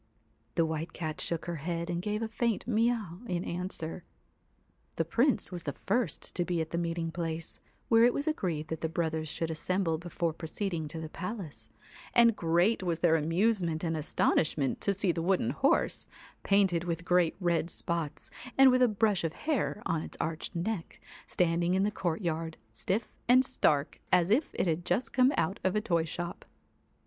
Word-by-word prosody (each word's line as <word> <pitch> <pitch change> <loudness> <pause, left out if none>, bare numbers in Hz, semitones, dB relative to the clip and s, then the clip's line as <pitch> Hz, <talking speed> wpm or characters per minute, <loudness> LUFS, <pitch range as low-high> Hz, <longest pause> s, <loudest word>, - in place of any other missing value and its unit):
The 165 - +3
White 160 +1 -3
Cat 155 -2 -4
shook 170 -2 -1
her 170 -1 -3
head 170 +2 -3
and 175 -1 -2
gave 210 +3 -2
a - - -1
faint 225 0 -1
mee 235 0 +3
aw 200 -8 -5
in 175 -1 -1
answer. 175 -1 -3 0.9
The - - 0
Prince 245 -5 +2
was 175 -1 -3
the 145 -3 -4
first 200 - -1
to 175 - 0
be 175 -1 -1
at 160 0 -3
the 170 - -1
meeting 165 -1 -2
place, 165 -1 -4 0.3
where 230 0 +5
it 240 - +6
was 285 - -2
agreed 170 - -1
that 160 - -4
the 160 - -1
brothers 160 -1 -1
should 165 +1 -2
assemble 165 0 0
before 170 -1 -2
proceeding 165 0 -3
to 160 +2 -5
the 160 - -5
palace, 155 - -6 0.5
and 235 -2 +6
great 175 +6 +2
was 175 -3 -1
their 165 -1 +4
amusement 170 +1 +1
and 165 -1 0
astonishment 150 -2 +1
to 200 - +1
see 195 -1 +1
the 165 - -3
wooden 185 +2 +1
horse, - - +1 0.3
painted 190 -4 +3
with 170 -1 -3
great 175 -2 +3
red 170 -2 +1
spots, 165 -5 -3 0.3
and 270 -1 +8
with 255 0 +3
a 250 - +7
brush 210 -3 +1
of 165 -1 -1
hair 275 - -1
on 165 -1 0
its - - -7
arched 160 +1 -3
neck, 175 +1 -3 0.3
standing 175 +1 +1
in 190 - +2
the 210 - +1
courtyard, 165 -3 -2 0.2
stiff 195 - -2
and 255 +2 +6
stark 150 - +1
as 180 +2 +4
if 275 +8 +3
it - - +1
had 165 0 0
just 225 +8 -1
come 255 +1 +5
out 185 +5 0
of 190 +1 +1
a - - +3
toy 170 -5 +1
shop. 175 +2 -5
175 Hz, 185 wpm, -30 LUFS, 165-200 Hz, 0.9 s, and